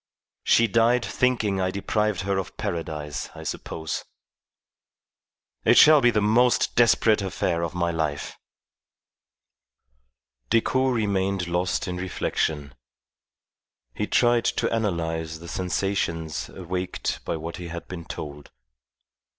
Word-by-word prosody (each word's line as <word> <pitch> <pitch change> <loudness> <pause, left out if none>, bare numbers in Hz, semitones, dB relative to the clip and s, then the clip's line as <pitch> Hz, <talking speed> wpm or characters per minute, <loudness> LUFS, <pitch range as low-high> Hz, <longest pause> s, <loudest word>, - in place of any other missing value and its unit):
She 115 - +5
died 115 +3 +3
thinking 110 -6 +1
I 95 - +1
deprived 105 +1 -1
her 100 0 0
of 95 - -7
Paradise, 75 -3 -4
I - - -8
suppose. 80 -2 -4 1.6
It - - +5
shall 155 -1 +8
be 120 - +5
the 110 - +2
most 120 +4 +3
desperate 115 -2 +4
affair 90 -3 -1
of 85 0 -3
my 85 -1 0
life." 75 -3 -3 2.1
Decoud 130 +3 +2
remained 100 -4 0
lost 90 +2 -1
in 90 0 -3
reflection. 75 -5 -2 1.2
He 105 - -2
tried 120 -1 +3
to - - 0
analyze 80 -7 -2
the 85 +1 -11
sensations 90 -3 -2
awaked 90 0 -4
by 85 - -2
what 80 +2 -6
he 90 -2 -7
had 85 0 -7
been 85 -3 -7
told. 75 -2 -8
95 Hz, 120 wpm, -25 LUFS, 85-110 Hz, 2.1 s, shall